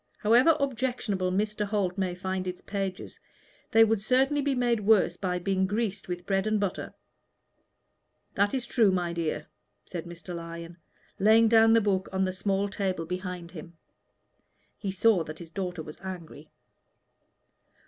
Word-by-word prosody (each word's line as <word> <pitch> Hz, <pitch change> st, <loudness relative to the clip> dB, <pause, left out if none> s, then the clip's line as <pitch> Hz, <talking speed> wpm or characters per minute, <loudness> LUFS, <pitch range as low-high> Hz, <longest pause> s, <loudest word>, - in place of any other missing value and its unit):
"However 245 Hz, +9 st, +5 dB
objectionable 245 Hz, -8 st, -1 dB
Mr. 210 Hz, +2 st, -1 dB
Holt 200 Hz, -3 st, -1 dB
may 185 Hz, -2 st, -1 dB
find 185 Hz, 0 st, -3 dB
its 180 Hz, 0 st, -4 dB
pages, 195 Hz, -2 st, -5 dB, 0.5 s
they 225 Hz, -, +6 dB
would 225 Hz, -2 st, +2 dB
certainly 265 Hz, +6 st, +2 dB
be 280 Hz, -1 st, 0 dB
made 240 Hz, -2 st, +1 dB
worse 210 Hz, -1 st, +3 dB
by 180 Hz, -2 st, -2 dB
being 190 Hz, +1 st, 0 dB
greased 205 Hz, -1 st, -2 dB
with 175 Hz, -1 st, -5 dB
bread 195 Hz, +1 st, 0 dB
and 215 Hz, -1 st, +1 dB
butter." 200 Hz, -3 st, -3 dB, 1.4 s
"That 205 Hz, +4 st, +1 dB
is 260 Hz, -1 st, -2 dB
true, 230 Hz, -3 st, +3 dB
my 175 Hz, -2 st, -1 dB
dear," 155 Hz, -3 st, -2 dB, 0.4 s
said 175 Hz, -3 st, -6 dB
Mr. 175 Hz, +1 st, -9 dB
Lyon, 170 Hz, 0 st, -7 dB, 0.4 s
laying 220 Hz, +3 st, +6 dB
down 225 Hz, 0 st, +6 dB
the 230 Hz, -, +5 dB
book 195 Hz, -2 st, 0 dB
on 190 Hz, 0 st, +1 dB
the 185 Hz, -, -2 dB
small 195 Hz, +1 st, 0 dB
table 190 Hz, -4 st, -2 dB
behind 180 Hz, 0 st, -5 dB
him. 170 Hz, -1 st, -11 dB, 1.0 s
He 200 Hz, -, -5 dB
saw 190 Hz, -1 st, +3 dB
that 155 Hz, 0 st, -8 dB
his 165 Hz, -1 st, -11 dB
daughter 180 Hz, -3 st, -4 dB
was 155 Hz, 0 st, -11 dB
angry. 170 Hz, -5 st, -8 dB
195 Hz, 155 wpm, -28 LUFS, 180-215 Hz, 1.4 s, they